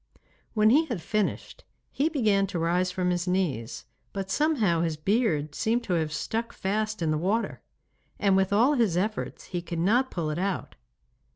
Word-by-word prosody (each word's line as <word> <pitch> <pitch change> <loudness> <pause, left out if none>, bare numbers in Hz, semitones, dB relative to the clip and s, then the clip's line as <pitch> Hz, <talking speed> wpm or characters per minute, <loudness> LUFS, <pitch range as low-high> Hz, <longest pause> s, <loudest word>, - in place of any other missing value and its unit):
When 215 0 +5
he 310 +6 +5
had 235 - -3
finished 210 +5 -2 0.3
he 290 +4 +1
began 210 -10 +2
to 190 -2 -4
rise 175 +2 +1
from 180 -1 0
his 175 0 -1
knees, 165 -12 -1 0.3
but 195 -1 -4
somehow 220 - +2
his 165 -2 -1
beard 155 - 0
seemed 230 +9 0
to 185 - -2
have 160 -3 0
stuck 225 +10 -3
fast 215 0 -2
in 155 - +1
the 155 - 0
water, 205 +7 -1 0.6
and 195 -2 +3
with 190 0 +2
all 235 +8 +4
his 225 - +2
efforts 210 +4 -2
he 175 - -1
could 170 0 -5
not 230 +10 +2
pull 160 -4 -2
it 150 - -3
out. 195 0 -2
195 Hz, 180 wpm, -27 LUFS, 170-220 Hz, 0.6 s, When